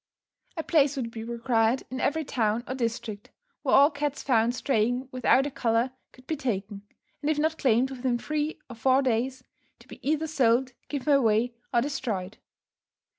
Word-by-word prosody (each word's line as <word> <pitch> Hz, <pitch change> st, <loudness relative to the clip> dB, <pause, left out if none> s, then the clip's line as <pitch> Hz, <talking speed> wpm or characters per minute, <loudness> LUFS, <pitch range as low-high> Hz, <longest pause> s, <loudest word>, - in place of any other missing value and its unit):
A 320 Hz, -, -2 dB
place 290 Hz, -3 st, +3 dB
would 240 Hz, -4 st, -3 dB
be 225 Hz, -1 st, -6 dB
required 235 Hz, +1 st, +1 dB
in 260 Hz, -, -4 dB
every 315 Hz, +2 st, 0 dB
town, 225 Hz, -2 st, 0 dB
or -, -, -3 dB
district, 230 Hz, -4 st, -4 dB, 0.3 s
where -, -, +3 dB
all 280 Hz, +2 st, +7 dB
cats 290 Hz, -1 st, -3 dB
found 235 Hz, -2 st, +2 dB
straying 250 Hz, 0 st, 0 dB
without 255 Hz, +2 st, +3 dB
a 290 Hz, -, -3 dB
collar 235 Hz, +1 st, +1 dB, 0.2 s
could 255 Hz, -, -19 dB
be 315 Hz, -, -2 dB
taken, 205 Hz, -6 st, -3 dB, 0.4 s
and 295 Hz, -, -1 dB
if 310 Hz, -, +1 dB
not 315 Hz, +1 st, 0 dB
claimed 255 Hz, +1 st, +3 dB
within 255 Hz, -2 st, -1 dB
three 300 Hz, +4 st, -2 dB
or 240 Hz, -, -9 dB
four 260 Hz, +4 st, +3 dB
days, 255 Hz, +1 st, -1 dB, 0.3 s
to -, -, -20 dB
be -, -, -11 dB
either 305 Hz, +4 st, 0 dB
sold, 260 Hz, -4 st, +2 dB, 0.2 s
given 290 Hz, 0 st, 0 dB
away, 235 Hz, -2 st, +3 dB, 0.2 s
or 235 Hz, -, +3 dB
destroyed. 215 Hz, -8 st, -3 dB
255 Hz, 175 wpm, -27 LUFS, 230-280 Hz, 0.4 s, all